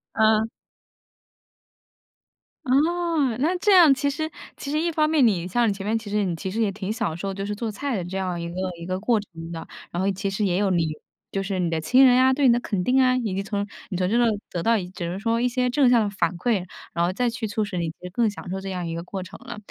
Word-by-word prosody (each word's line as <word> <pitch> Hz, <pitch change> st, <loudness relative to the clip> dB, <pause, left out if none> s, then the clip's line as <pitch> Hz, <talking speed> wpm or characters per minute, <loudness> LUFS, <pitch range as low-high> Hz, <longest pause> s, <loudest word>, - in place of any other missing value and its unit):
嗯。 220 Hz, 0 st, +3 dB, 2.2 s
哦， 305 Hz, -1 st, +2 dB
那 320 Hz, +7 st, +2 dB
这 410 Hz, +3 st, +3 dB
样 340 Hz, -6 st, +8 dB
其 285 Hz, +1 st, 0 dB
实 315 Hz, +3 st, -3 dB, 0.3 s
其 280 Hz, -, -6 dB
实 300 Hz, +2 st, 0 dB
一 340 Hz, +1 st, 0 dB
方 310 Hz, -1 st, +2 dB
面 305 Hz, -5 st, +4 dB
你 180 Hz, -6 st, +1 dB
像 235 Hz, +6 st, +2 dB
你 205 Hz, -, +2 dB
前 195 Hz, 0 st, -7 dB
面 220 Hz, +2 st, +1 dB
其 225 Hz, -2 st, -7 dB
实 210 Hz, 0 st, +1 dB
你 175 Hz, -3 st, -1 dB
其 190 Hz, +3 st, -5 dB
实 225 Hz, +4 st, -1 dB
也 210 Hz, -3 st, +2 dB
挺 195 Hz, 0 st, -4 dB
享 220 Hz, -8 st, -2 dB
受 195 Hz, +3 st, -4 dB
就 195 Hz, +1 st, -4 dB
是 205 Hz, +1 st, -3 dB
做 225 Hz, +1 st, -3 dB
菜 265 Hz, +5 st, -3 dB
的 185 Hz, -, -2 dB
这 180 Hz, +2 st, -5 dB
样 185 Hz, -2 st, -2 dB
一 170 Hz, 0 st, -4 dB
个 170 Hz, -, -8 dB, 0.2 s
一 170 Hz, -, -8 dB
个 185 Hz, +1 st, -2 dB
过 220 Hz, +2 st, +2 dB
程 165 Hz, -5 st, -9 dB
的。 165 Hz, -1 st, -6 dB, 0.3 s
然 175 Hz, -, -2 dB
后 195 Hz, +1 st, +2 dB
其 195 Hz, +1 st, -3 dB
实 195 Hz, +2 st, -2 dB
也 180 Hz, -2 st, +1 dB
有 200 Hz, 0 st, +2 dB
你 170 Hz, -3 st, +2 dB, 0.4 s
就 195 Hz, -, -1 dB
是 195 Hz, 0 st, -3 dB
你 175 Hz, -2 st, +1 dB
的 165 Hz, -1 st, -1 dB
亲 255 Hz, +12 st, +5 dB
人 250 Hz, -1 st, +6 dB
啊， 260 Hz, 0 st, +5 dB
对 280 Hz, +1 st, +1 dB
你 240 Hz, -, +6 dB
的 240 Hz, -, +2 dB
肯 200 Hz, -6 st, -2 dB
定 260 Hz, +6 st, +3 dB
啊， 255 Hz, -1 st, +4 dB
以 230 Hz, -6 st, -1 dB
及 195 Hz, -, -1 dB
从 200 Hz, 0 st, -2 dB, 0.2 s
你 185 Hz, -, -3 dB
从 180 Hz, 0 st, 0 dB
这 230 Hz, -, +2 dB, 0.3 s
得 175 Hz, -, -2 dB
到 230 Hz, +5 st, +3 dB, 0.2 s
只 175 Hz, -2 st, -4 dB
能 180 Hz, +3 st, -4 dB
说 230 Hz, +2 st, 0 dB
一 245 Hz, -, +2 dB
些 250 Hz, 0 st, 0 dB
正 265 Hz, 0 st, +4 dB
向 240 Hz, -2 st, +5 dB
的 205 Hz, -, -1 dB
反 195 Hz, -2 st, -1 dB
馈， 195 Hz, -1 st, 0 dB, 0.3 s
然 170 Hz, -, +1 dB
后 180 Hz, -, -1 dB
再 245 Hz, +4 st, +1 dB
去 230 Hz, -1 st, -4 dB
促 215 Hz, +1 st, -1 dB
使 200 Hz, -3 st, -4 dB
你 170 Hz, -2 st, -1 dB
就 -, -, -23 dB, 0.2 s
更 230 Hz, +3 st, +2 dB
享 200 Hz, -3 st, -8 dB
受 190 Hz, +1 st, -3 dB
这 195 Hz, 0 st, -6 dB
样 180 Hz, -2 st, -3 dB
一 165 Hz, -, -4 dB
个 165 Hz, 0 st, -4 dB
过 190 Hz, +1 st, -5 dB
程 180 Hz, -, -11 dB
了。 240 Hz, -3 st, -7 dB
210 Hz, 290 characters per minute, -24 LUFS, 185-250 Hz, 2.2 s, 样